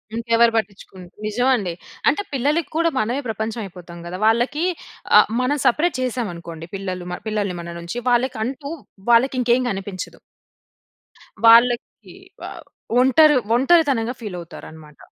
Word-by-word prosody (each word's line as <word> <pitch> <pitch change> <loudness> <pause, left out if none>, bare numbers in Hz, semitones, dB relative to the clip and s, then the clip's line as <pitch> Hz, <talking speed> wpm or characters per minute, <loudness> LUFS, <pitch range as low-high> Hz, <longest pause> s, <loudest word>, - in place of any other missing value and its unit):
ఇంకెవరు 230 0 +3
పట్టించుకున్ 195 -3 -5 0.2
నిజవండి. 215 -4 +1 0.4
అంటే, 300 +8 0
పిల్లలకి 285 +4 0
కూడా 335 0 +3
మనమే 240 +6 -1
ప్రపంచవయిపోతాం 200 -6 -6
గదా! 180 +1 -6
వాళ్ళకీ 240 +8 +1 0.5
ఆహ్, - - +4
మనం 285 +4 0
సపరేట్ 300 +6 +2
చేశామనుకోండి, 170 -10 -5
పిల్లలు 185 -2 -5
మ - - -2
పిల్లల్ని 205 -4 -2
మన 170 0 -8
నుంచి, 170 +8 -6
వాళ్ళకంటూ 260 +4 -1 0.4
వాళ్ళకింకేం 250 0 +3
కనిపించదు. 195 -1 -6 1.3
వాళ్ళకి 235 +1 +4 0.3
వవ్ - - -8 0.4
ఒంటరు 290 +3 +5 0.2
ఒంటరితనంగా 270 -4 +3
ఫీలవుతారనమాట. 160 -6 -10
230 Hz, 105 wpm, -21 LUFS, 190-260 Hz, 1.3 s, ఒంటరు